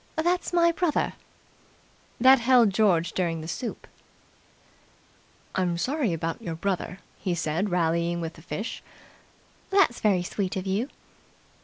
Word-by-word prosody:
"That's 350 +3 0
my 340 -1 +4
brother." 335 -2 0 1.1
That 260 +2 +7
held 235 -3 +5
George 185 -5 +2
during 170 -3 -1
the 160 - -7
soup. 230 +7 -5 1.7
"I'm 180 -2 0
sorry 260 - 0
about 165 0 -3
your 165 -2 -4
brother," 185 +1 -2 0.2
he 180 -2 -1
said 170 +4 -1
rallying 170 0 +1
with 165 -1 -4
the 160 - -15
fish. 210 +7 -5 0.9
"That's 390 -11 +3
very 195 -4 +2
sweet 190 +1 -3
of 190 0 -3
you." 200 +8 -1
190 Hz, 130 wpm, -26 LUFS, 170-250 Hz, 1.7 s, That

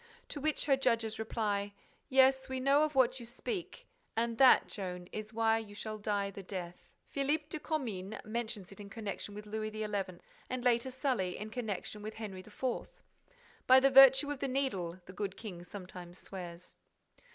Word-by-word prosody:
To 290 - -5
which 310 +1 0
her 280 -2 +5
judges 230 -4 +1
reply, 205 -2 -1 0.4
"Yes, 265 0 +5
we 260 0 -2
know 275 +3 +4
of 305 -1 -1
what 260 0 +4
you 235 - -9
speak; 375 - -5 0.3
and 230 0 0
that, 265 -1 +8
Joan, 180 -3 -5
is 215 0 -5
why 225 0 +3
you 205 -2 -9
shall 215 +1 -5
die 205 -1 -1
the 200 - -8
death." 180 -2 -7 0.2
Philippe 295 +2 0
de 310 - -4
Comines 220 - -3
mentions 215 -3 -3
it 195 - -12
in 200 -1 -8
connection 205 -2 -5
with 210 0 -7
Louis 215 +1 -3
XI., 215 0 -4 0.7
and, 255 -1 -3
later, 240 +1 +3
Sully 255 -8 -1
in 215 +1 -6
connection 215 -3 -4
with 215 +1 -6
Henry 210 -4 -6
IV.: 210 +6 -14 1.0
"By 260 +1 +9
the 270 +1 +4
virtue 270 +1 +8
of 290 - -4
the 275 - -1
Needle!" 195 -11 -1
the 185 - -10
good 195 0 -4
king 180 -6 -7
sometimes 180 -2 -9
swears. 180 -3 -8
220 Hz, 175 wpm, -33 LUFS, 200-265 Hz, 1.0 s, By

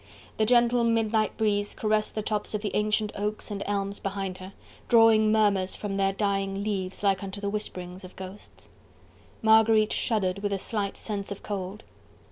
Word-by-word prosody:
The 215 - +2
gentle 240 0 +4
midnight 225 -1 +1
breeze 205 -2 0
caressed 215 -1 0
the 215 - -2
tops 210 0 -2
of 210 - -3
the 205 - -2
ancient 210 0 +1
oaks 210 +1 -3
and 200 -1 -4
elms 200 0 -2
behind 195 -1 -4
her, 190 +1 -9 0.4
drawing 225 -2 +6
murmurs 205 -4 +2
from 205 -2 -4
their 195 0 +2
dying 195 -1 -1
leaves 195 -2 -3
like 195 -2 +2
unto 195 0 -5
the 200 0 -2
whisperings 185 -3 -5
of 185 - -11
ghosts. 190 +2 -10 0.7
Marguerite 220 -1 +5
shuddered 200 -5 0
with 205 0 -1
a - - 0
slight 200 0 -3
sense 205 -2 -5
of 200 - -7
cold. 200 +1 -5
205 Hz, 170 wpm, -27 LUFS, 195-215 Hz, 0.7 s, drawing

